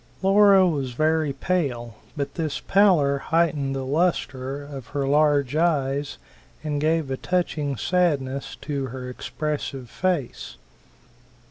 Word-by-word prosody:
Laura 195 -1 +6
was 140 -7 -2
very 155 +2 +1
pale, 135 -6 -2 0.2
but 140 -1 -3
this 160 -4 -3
pallor 170 -9 +3
heightened 150 -4 0
the 135 -1 -3
lustre 140 -3 -1
of 140 -4 -9
her 140 -1 -2
large 145 -1 +2
eyes 145 -4 0 0.5
and 150 -2 -2
gave 155 -2 +1
a 130 - -1
touching 155 -5 -1
sadness 140 - 0
to 140 -3 -4
her 130 0 -7
expressive 135 -1 -4
face. 135 - -2
145 Hz, 120 wpm, -24 LUFS, 135-165 Hz, 0.5 s, Laura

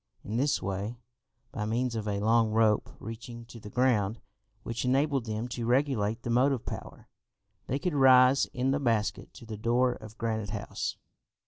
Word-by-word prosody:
In 110 +3 -3
this 140 +3 +1
way, 100 +5 -3 0.5
by 105 - -3
means 120 +3 0
of 110 -2 -3
a 100 -1 -1
long 115 +1 +3
rope 110 -1 +2
reaching 115 +1 -8
to 115 0 -12
the 105 - -10
ground, 115 -3 +1 0.4
which 115 0 -3
enabled 135 0 +1
them 110 +1 -3
to 120 -1 -4
regulate 120 -4 +1
the 120 - -2
motive 130 +1 +2
power, - - -8 0.6
they 130 - 0
could 180 +2 -2
rise 130 -1 +6
in 130 -1 -1
the 140 - +1
basket 115 -6 0
to 125 - -11
the 110 -1 -6
door 120 +3 +2
of 110 -1 -12
Granite 110 -2 -2
House. 105 -1 -4
115 Hz, 175 wpm, -29 LUFS, 110-130 Hz, 0.6 s, rise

